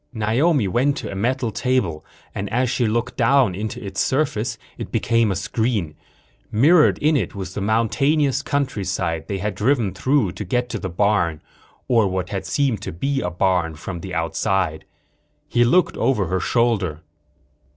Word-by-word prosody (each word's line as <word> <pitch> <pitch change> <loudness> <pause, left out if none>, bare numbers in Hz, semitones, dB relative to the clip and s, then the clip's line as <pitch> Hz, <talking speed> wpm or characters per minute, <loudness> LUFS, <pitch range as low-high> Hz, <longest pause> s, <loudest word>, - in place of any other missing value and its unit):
Naomi 115 - +2
went 130 +8 +1
to - - -5
a - - -6
metal 120 +3 0
table 105 -12 -1 0.3
and 100 0 -4
as 125 +1 +1
she 120 -4 +1
looked 115 +2 -1
down 130 -4 +3
into 105 +3 -4
its 95 -1 -2
surface 130 -6 0 0.2
it - - -6
became 115 -2 +2
a - - -1
screen. 110 -4 -1 0.6
Mirrored 150 +9 +5
in 155 +1 +2
it 105 -10 -1
was 95 -2 -6
the 100 - -4
mountainous 135 +7 +1
countryside 95 - -2
they 100 - -2
had 105 +2 -2
driven 110 0 +1
through 130 -8 +1
to 95 +4 -6
get 125 +5 -1
to 110 - -3
the 95 - -4
barn 90 -3 +1 0.5
or 115 -5 +3
what 95 -1 -3
had 95 -2 -4
seemed 125 -2 0
to - - -5
be 135 - -1
a 90 - -1
barn 90 -2 0
from 85 +4 -6
the 95 +2 -7
outside. 85 0 -1 0.6
He 120 - +3
looked 165 +9 +3
over 115 -8 +1
her 95 +2 -1
shoulder. 100 -8 0
110 Hz, 170 wpm, -21 LUFS, 95-130 Hz, 0.6 s, Mirrored